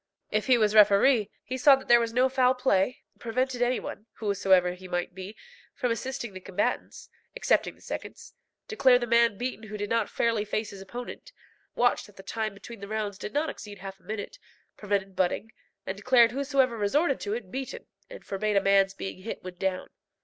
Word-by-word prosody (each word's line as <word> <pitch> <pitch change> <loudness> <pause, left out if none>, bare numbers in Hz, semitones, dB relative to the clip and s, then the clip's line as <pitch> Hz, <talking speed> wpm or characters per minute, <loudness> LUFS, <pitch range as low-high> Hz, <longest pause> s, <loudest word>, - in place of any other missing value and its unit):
If 215 +3 0
he 255 -2 +6
was 215 -2 +2
referee, 210 +2 +5
he 260 +1 -5
saw 275 +2 +8
that 265 - -10
there 240 0 +7
was 230 -1 -1
no 250 +3 +3
foul 260 -1 +3
play, 250 -3 +1 0.2
prevented 250 +2 -1
any 245 +1 +2
one, 215 - -8
whosoever 190 -4 +2
he 185 +1 -11
might 175 0 -2
be, 190 +3 -8 0.4
from 250 -2 -1
assisting 235 -1 -4
the 185 - -7
combatants, 190 +1 -3 0.3
excepting - - +1
the - - -24
seconds, - - -7 0.3
declare 265 -12 +5
the 245 - -2
man 235 -2 +3
beaten 245 -2 -4
who 210 0 -6
did 205 0 -4
not 230 -2 +1
fairly 230 -3 +1
face 215 +1 -3
his 195 -1 -10
opponent, 245 - -8 0.4
watched 245 0 +2
that 205 - -19
the 195 - -11
time 215 -1 -3
between 220 +3 -11
the 200 - -8
rounds 210 -2 -3
did - - -5
not 300 +2 0
exceed 205 -1 -10
half 195 0 -9
a - - -29
minute, 215 - -6 0.4
prevented 195 -2 -2
butting, 185 +4 0 0.3
and 190 - -4
declared 240 +1 +5
whoever 270 -2 +1
resorted 275 +8 +1
to 205 +1 -2
it 215 -6 -7
beaten, 265 0 -5 0.2
and - - -11
forbade 210 +2 -1
a - - +6
man's 195 0 +3
being 195 -1 -6
hit 220 - -6
when 185 0 -7
down. 185 0 -3
215 Hz, 200 wpm, -27 LUFS, 195-250 Hz, 0.4 s, saw